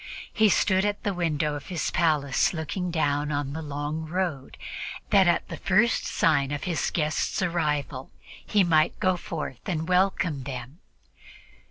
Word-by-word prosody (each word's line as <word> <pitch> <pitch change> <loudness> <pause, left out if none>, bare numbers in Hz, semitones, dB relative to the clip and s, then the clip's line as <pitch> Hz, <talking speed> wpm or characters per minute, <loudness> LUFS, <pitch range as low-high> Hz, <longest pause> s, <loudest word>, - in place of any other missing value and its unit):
He 215 -1 +4
stood 190 0 +3
at 205 0 -1
the 205 -2 0
window 155 -4 0
of 145 - -7
his 175 -5 -2
palace 150 -4 +2
looking 180 +3 -3
down 145 -3 0 0.2
the 160 - -4
long 150 +1 -4
road, 170 -6 -3 0.5
that 195 -3 +6
at 175 - +2
the - - -6
first 215 +5 +2
sign 145 -4 +2
of 145 -1 -3
his 170 -4 -1
guests' 155 +2 -1
arrival 150 -6 -1 0.3
he 205 -2 +3
might 160 -2 +2
go 185 -1 +2
forth 155 -7 -5
and 160 -2 -2
welcome 180 -5 +1
them. 130 +3 -7
160 Hz, 150 wpm, -26 LUFS, 145-180 Hz, 0.5 s, that